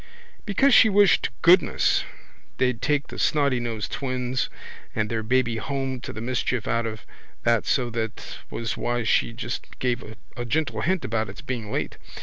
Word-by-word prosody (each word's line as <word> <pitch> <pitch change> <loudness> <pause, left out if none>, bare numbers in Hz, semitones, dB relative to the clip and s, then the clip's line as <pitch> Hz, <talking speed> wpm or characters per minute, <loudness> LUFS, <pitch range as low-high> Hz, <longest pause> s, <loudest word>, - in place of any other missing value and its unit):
Because 265 +7 +4
she 220 - +8
wished 205 -2 +5
to - - 0
goodness 180 +2 +5 0.5
they'd 125 -2 +1
take 145 -1 0
the - - -8
snottynosed 120 -8 0
twins 130 -1 -2 0.5
and 110 0 -1
their 115 -1 0
babby 120 0 +1
home 135 +1 -3
to - - -6
the 110 - -7
mischief 125 -1 -1
out 115 +1 +1
of 110 -1 -7 0.4
that 115 -2 +2
so 125 -3 +1
that 115 -1 -4
was 115 -3 -3
why 120 0 -1
she 110 - +2
just 120 0 -6
gave 125 -1 -1 0.3
a 120 - -4
gentle 155 +6 -1
hint 185 0 0
about 110 -2 -1
its 95 - -9
being 120 -6 -4
late. - - -2
125 Hz, 165 wpm, -25 LUFS, 115-140 Hz, 0.5 s, she